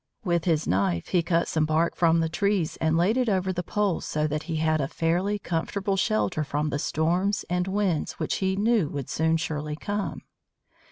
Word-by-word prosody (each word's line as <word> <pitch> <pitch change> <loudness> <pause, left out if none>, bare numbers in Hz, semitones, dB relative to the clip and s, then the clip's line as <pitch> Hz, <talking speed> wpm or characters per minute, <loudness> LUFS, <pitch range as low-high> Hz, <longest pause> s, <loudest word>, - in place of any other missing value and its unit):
With 170 -4 0
his 160 -3 +1
knife 90 -2 0
he 180 - +3
cut 170 0 +1
some 155 -1 +1
bark 160 +2 +1
from 165 -1 +3
the 165 - +1
trees 190 0 0
and 160 0 +1
laid 190 +8 +2
it 250 -3 +2
over 190 -1 0
the 180 - -2
poles 200 0 -1
so 150 0 -1
that 150 0 -1
he 165 - -1
had 155 -1 +1
a 135 - -1
fairly 175 +6 0
comfortable 195 +2 -2
shelter 195 -5 +1
from 150 +1 -2
the 145 - -1
storms 180 +8 0
and 180 +1 0
winds 190 -5 0
which - - -2
he 190 0 0
knew 210 -5 +2
would 140 -3 -5
soon 160 0 +2
surely 150 -1 -3
come. 200 +2 -3
170 Hz, 200 wpm, -26 LUFS, 155-195 Hz, -, he